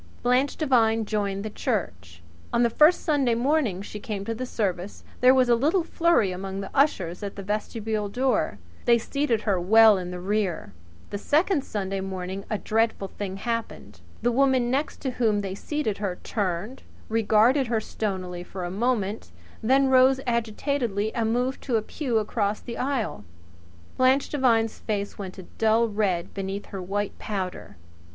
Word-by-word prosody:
Blanche 250 Hz, +3 st, +2 dB
Devine 225 Hz, -7 st, +2 dB
joined 205 Hz, -1 st, -2 dB
the -, -, -2 dB
church. 90 Hz, -, -3 dB, 0.3 s
On 235 Hz, -, +3 dB
the 235 Hz, -, +2 dB
first 305 Hz, +8 st, +5 dB
Sunday 275 Hz, -7 st, +2 dB
morning 240 Hz, -, +1 dB
she 210 Hz, -, -7 dB
came 205 Hz, -2 st, -5 dB
to 230 Hz, -, -2 dB
the 255 Hz, +3 st, -5 dB
service 195 Hz, -4 st, -3 dB, 0.2 s
there 250 Hz, +1 st, +7 dB
was 260 Hz, -1 st, +4 dB
a 240 Hz, -, +5 dB
little 305 Hz, +10 st, +2 dB
flurry 335 Hz, -, +2 dB
among 190 Hz, +1 st, -5 dB
the 195 Hz, -, -6 dB
ushers 190 Hz, -, +1 dB
at 200 Hz, -1 st, -5 dB
the 200 Hz, -, -7 dB
vestibule 210 Hz, +1 st, -2 dB
door. 240 Hz, -, 0 dB, 0.3 s
They 235 Hz, -1 st, +6 dB
seated 240 Hz, -1 st, -1 dB
her 200 Hz, -5 st, +1 dB
well 215 Hz, +2 st, +6 dB
in 180 Hz, -1 st, -5 dB
the 180 Hz, 0 st, -6 dB
rear. 195 Hz, -1 st, -2 dB, 0.4 s
The 205 Hz, -, -3 dB
second 305 Hz, -, +2 dB
Sunday 195 Hz, -4 st, -3 dB
morning 190 Hz, 0 st, -5 dB
a 215 Hz, -, 0 dB
dreadful 220 Hz, -2 st, 0 dB
thing 195 Hz, -2 st, -5 dB
happened. 230 Hz, +2 st, -4 dB, 0.2 s
The 240 Hz, -, +3 dB
woman 260 Hz, -1 st, +2 dB
next 280 Hz, +4 st, -1 dB
to 265 Hz, -, -2 dB
whom 220 Hz, -4 st, +1 dB
they 195 Hz, -2 st, -4 dB
seated 220 Hz, -1 st, -3 dB
her 190 Hz, -4 st, -2 dB
turned, 205 Hz, +4 st, -3 dB, 0.3 s
regarded 225 Hz, +4 st, +3 dB
her 230 Hz, -1 st, +1 dB
stonily 185 Hz, -5 st, -4 dB
for 185 Hz, 0 st, -7 dB
a 175 Hz, -, -4 dB
moment, 210 Hz, -, -1 dB, 0.3 s
then 265 Hz, +4 st, +3 dB
rose 260 Hz, 0 st, +5 dB
agitatedly 235 Hz, -2 st, -1 dB
and 225 Hz, -1 st, 0 dB
moved 250 Hz, +3 st, -1 dB
to 250 Hz, -, 0 dB
a 215 Hz, -, -2 dB
pew 250 Hz, -2 st, -2 dB
across 210 Hz, -1 st, 0 dB
the 235 Hz, -, -7 dB
aisle. 255 Hz, -, -2 dB, 0.7 s
Blanche 260 Hz, +2 st, +3 dB
Devine's 230 Hz, -6 st, +2 dB
face 205 Hz, -2 st, -3 dB
went 190 Hz, -1 st, -6 dB
a 190 Hz, -, -8 dB, 0.2 s
dull 225 Hz, +1 st, +4 dB
red 205 Hz, -5 st, -1 dB
beneath 195 Hz, +1 st, -4 dB
her 195 Hz, -, -4 dB
white 200 Hz, +2 st, -3 dB
powder. 185 Hz, -, -5 dB
220 Hz, 170 wpm, -25 LUFS, 195-250 Hz, 0.7 s, there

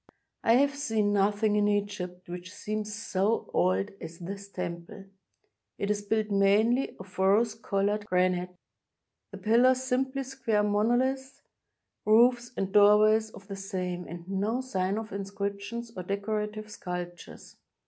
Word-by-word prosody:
I 230 Hz, -, +5 dB
have 280 Hz, +3 st, +4 dB
seen 220 Hz, -7 st, 0 dB
nothing 205 Hz, +1 st, +2 dB
in 205 Hz, 0 st, +3 dB
Egypt 200 Hz, -3 st, -2 dB
which 180 Hz, +1 st, -7 dB
seems 215 Hz, +1 st, -4 dB
so 215 Hz, -1 st, -1 dB
old 95 Hz, +2 st, +1 dB
as 165 Hz, +1 st, -8 dB
this 195 Hz, +3 st, -7 dB
temple. 180 Hz, +1 st, -6 dB, 0.7 s
It 200 Hz, -, -1 dB
is 205 Hz, 0 st, -1 dB
built 215 Hz, +1 st, -1 dB
mainly 210 Hz, +6 st, +3 dB
of 190 Hz, 0 st, -12 dB
rose 205 Hz, +4 st, +3 dB
colored 205 Hz, -1 st, -1 dB
granite, 180 Hz, -2 st, +1 dB, 0.8 s
the -, -, -9 dB
pillars 250 Hz, +4 st, +4 dB
simply 265 Hz, +1 st, -1 dB
square 235 Hz, -5 st, 0 dB
monoUths, 245 Hz, +6 st, 0 dB, 0.6 s
roofs 240 Hz, +2 st, +4 dB
and 195 Hz, 0 st, -1 dB
doorways 215 Hz, +1 st, +6 dB
of 200 Hz, -2 st, -14 dB
the 200 Hz, -, -5 dB
same, 185 Hz, -2 st, -4 dB
and 170 Hz, 0 st, -9 dB
no 200 Hz, +5 st, -1 dB
sign 195 Hz, -6 st, -1 dB
of 220 Hz, -1 st, -5 dB
inscriptions 200 Hz, +3 st, -4 dB
or 185 Hz, -, -4 dB
decorative 210 Hz, +2 st, -3 dB
sculptures. 180 Hz, -3 st, -7 dB
205 Hz, 135 wpm, -28 LUFS, 190-225 Hz, 0.8 s, doorways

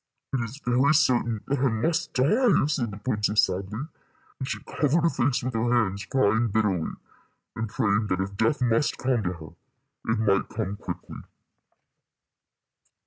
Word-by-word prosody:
"It 135 Hz, -, +1 dB
is 115 Hz, +5 st, -7 dB
very 130 Hz, +5 st, +3 dB
certain 120 Hz, -5 st, +2 dB
that 140 Hz, 0 st, -1 dB
I 135 Hz, 0 st, +3 dB
must 160 Hz, +10 st, -1 dB
die," 200 Hz, -, +3 dB
said 135 Hz, -6 st, -1 dB
the 100 Hz, -, -8 dB
princess, 105 Hz, -3 st, +2 dB
sadly, 100 Hz, +5 st, -2 dB, 0.6 s
and 130 Hz, -, -4 dB
she 120 Hz, -5 st, -2 dB
covered 155 Hz, +2 st, +1 dB
her 170 Hz, -, +4 dB
face 125 Hz, 0 st, 0 dB
with 130 Hz, +1 st, -2 dB
her 115 Hz, +1 st, 0 dB
hands, 100 Hz, -5 st, +1 dB
crying 115 Hz, -2 st, +2 dB
bitterly, 100 Hz, -6 st, 0 dB, 0.6 s
and 115 Hz, -1 st, -3 dB
praying 105 Hz, +1 st, +1 dB
that 90 Hz, -2 st, -1 dB
if 100 Hz, +1 st, -3 dB
death 115 Hz, +6 st, +1 dB
must 120 Hz, +4 st, +1 dB
come 125 Hz, -2 st, 0 dB
to 90 Hz, -2 st, -2 dB
her, 80 Hz, -3 st, -10 dB, 0.6 s
it 115 Hz, -, +1 dB
might 100 Hz, -3 st, +1 dB
come 105 Hz, -3 st, -3 dB
quickly. -, -, -7 dB
115 Hz, 160 wpm, -26 LUFS, 105-130 Hz, 0.6 s, her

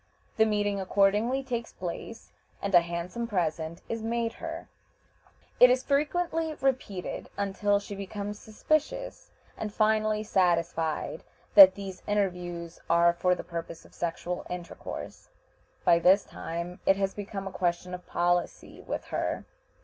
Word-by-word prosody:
The 220 Hz, 0 st, +5 dB
meeting 205 Hz, -1 st, 0 dB
accordingly 205 Hz, +7 st, +2 dB
takes 235 Hz, -3 st, -4 dB
place, 185 Hz, +5 st, -7 dB, 0.3 s
and 200 Hz, 0 st, -3 dB
a 175 Hz, -, +8 dB
handsome 175 Hz, +7 st, -4 dB
present 165 Hz, -5 st, -2 dB
is 230 Hz, 0 st, -3 dB
made 230 Hz, 0 st, -1 dB
her. 330 Hz, 0 st, -5 dB, 0.9 s
It 250 Hz, -, +10 dB
is 255 Hz, +1 st, +2 dB
frequently 320 Hz, +2 st, 0 dB
repeated, 255 Hz, -10 st, -2 dB
until 200 Hz, 0 st, +1 dB
she 205 Hz, 0 st, -8 dB
becomes 200 Hz, +1 st, -5 dB
suspicious, 310 Hz, -, -2 dB, 0.3 s
and 210 Hz, -, -4 dB
finally 215 Hz, 0 st, +2 dB
satisfied 170 Hz, -5 st, 0 dB, 0.3 s
that 190 Hz, -2 st, +10 dB
these 195 Hz, -2 st, -7 dB
interviews 175 Hz, -4 st, -2 dB
are 170 Hz, 0 st, +5 dB
for 180 Hz, +1 st, +2 dB
the -, -, -7 dB
purpose 165 Hz, -1 st, -7 dB
of -, -, -18 dB
sexual 175 Hz, +1 st, -3 dB
intercourse. 180 Hz, -1 st, -7 dB, 0.6 s
By 170 Hz, -, +6 dB
this 190 Hz, +4 st, +5 dB
time 170 Hz, +2 st, -6 dB
it 195 Hz, -, +6 dB
has 195 Hz, 0 st, -1 dB
become 200 Hz, -1 st, -6 dB
a -, -, -5 dB
question 180 Hz, 0 st, -1 dB
of 180 Hz, 0 st, -8 dB
policy 175 Hz, 0 st, -1 dB
with -, -, -4 dB
her. -, -, -1 dB
195 Hz, 135 wpm, -28 LUFS, 175-220 Hz, 0.9 s, It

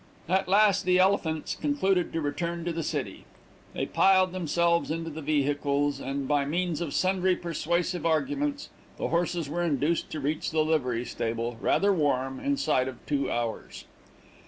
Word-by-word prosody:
At 190 Hz, +2 st, +1 dB
last, 200 Hz, 0 st, +4 dB
the 180 Hz, 0 st, +5 dB
Elephants 185 Hz, -4 st, +1 dB
concluded 195 Hz, -, 0 dB
to 165 Hz, -, -2 dB
return 170 Hz, +3 st, -3 dB
to 175 Hz, -, -1 dB
the 165 Hz, -, -2 dB
city. -, -, -4 dB, 0.5 s
They -, -, -1 dB
piled 185 Hz, -1 st, +4 dB
themselves 170 Hz, -1 st, +1 dB
into 165 Hz, +1 st, -3 dB
the 155 Hz, +1 st, -7 dB
vehicles, 145 Hz, -1 st, 0 dB
and 135 Hz, 0 st, -3 dB
by 145 Hz, 0 st, +2 dB
means 170 Hz, +3 st, -1 dB
of 160 Hz, -5 st, -3 dB
sundry 185 Hz, 0 st, +2 dB
persuasive 175 Hz, 0 st, -2 dB
arguments, 280 Hz, -, -1 dB, 0.3 s
the -, -, -2 dB
horses 170 Hz, -2 st, 0 dB
were 170 Hz, +5 st, -2 dB
induced 160 Hz, 0 st, 0 dB
to 155 Hz, -, -5 dB
reach 150 Hz, +2 st, -2 dB
the 155 Hz, -1 st, +1 dB
livery 125 Hz, -7 st, 0 dB
stable, 115 Hz, +1 st, -3 dB
rather 200 Hz, 0 st, +3 dB
warm, 135 Hz, -5 st, 0 dB
inside 155 Hz, -, +1 dB
of 130 Hz, -2 st, -8 dB
two 140 Hz, -3 st, -1 dB
hours. 120 Hz, -2 st, -4 dB
165 Hz, 160 wpm, -27 LUFS, 145-180 Hz, 0.5 s, the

